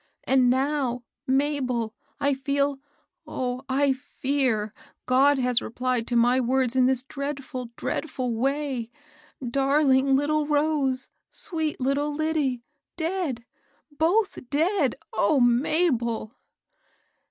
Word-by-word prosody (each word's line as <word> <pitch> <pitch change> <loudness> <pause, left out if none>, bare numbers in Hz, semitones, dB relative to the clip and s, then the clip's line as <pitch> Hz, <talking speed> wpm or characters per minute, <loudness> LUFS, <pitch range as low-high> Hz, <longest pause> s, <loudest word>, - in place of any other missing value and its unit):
And 255 -2 +4
now^ 260 -2 0 0.2
Mabel, 260 -5 0 0.3
I 280 0 +2
feel 280 +1 0 0.3
— - - -58
oh, 250 0 -3
I 275 +1 +3
fear^ 260 -5 -1 0.3
God 270 +3 +4
lias 250 -2 +2
replied 250 0 -2
to 245 - -1
my 245 +2 +4
words 255 0 +1
in 255 -1 +4
this 260 -1 +1
dreadful, 275 -3 -5
dreadful 255 -6 -3
way! 265 -1 -1 0.6
Darling 270 +1 +3
little 295 +2 +1
Rose! 290 -3 0 0.2
sweet 320 -3 -3
little 280 +3 0
Lyddie! 295 -5 -1 0.2
— - - -63
dead! 320 -8 -2 0.3
— 290 - -31
both 345 - +1
dead! 315 - +1 0.2
O 270 +8 +3
Mabel! 245 -3 +1
270 Hz, 115 wpm, -25 LUFS, 250-290 Hz, 0.6 s, And